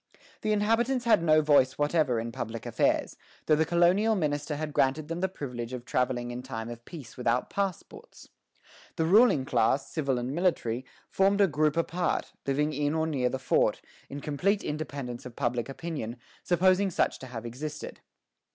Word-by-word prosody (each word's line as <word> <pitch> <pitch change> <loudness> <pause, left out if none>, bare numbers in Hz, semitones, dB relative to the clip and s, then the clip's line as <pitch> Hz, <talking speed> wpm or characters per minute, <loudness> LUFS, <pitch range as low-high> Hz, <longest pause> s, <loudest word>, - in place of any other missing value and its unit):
The 215 - 0
inhabitants 230 +4 +1
had 230 -7 +5
no 155 -2 +4
voice 130 -3 +4
whatever 145 -5 +1
in 115 +1 -4
public 115 0 -5
affairs, - - 0 0.3
though 155 - +4
the 160 +1 +1
colonial 180 +6 +3
minister 150 -4 -1
had 150 0 -4
granted 145 +4 +1
them 165 +1 -3
the 190 +1 0
privilege 125 -8 -6
of 125 -1 -6
travelling 120 -1 -1
in 120 +1 -5
time 115 -3 -6
of 120 0 -9
peace 150 -9 -10
without 125 0 0
passports. 195 -4 -5 0.7
The 160 - 0
ruling 190 - +5
class, 125 +2 +1
civil 140 -5 0
and 125 +2 -3
military, 135 -8 0 0.3
formed 195 +1 +3
a 200 - +7
group 155 -2 +1
apart, 170 +1 -1
living 150 +3 +1
in 145 +1 0
or 160 0 +1
near 135 -6 0
the 130 - -2
fort, 130 - +1 0.3
in 140 +1 -6
complete 185 +9 0
independence 140 -5 -5
of 120 - -12
public 120 -2 -1
opinion, 135 -6 -5 0.2
supposing 185 +3 +3
such 180 - 0
to 130 - -9
have 120 -2 -7
existed. 150 +6 -6
150 Hz, 170 wpm, -28 LUFS, 125-170 Hz, 0.7 s, a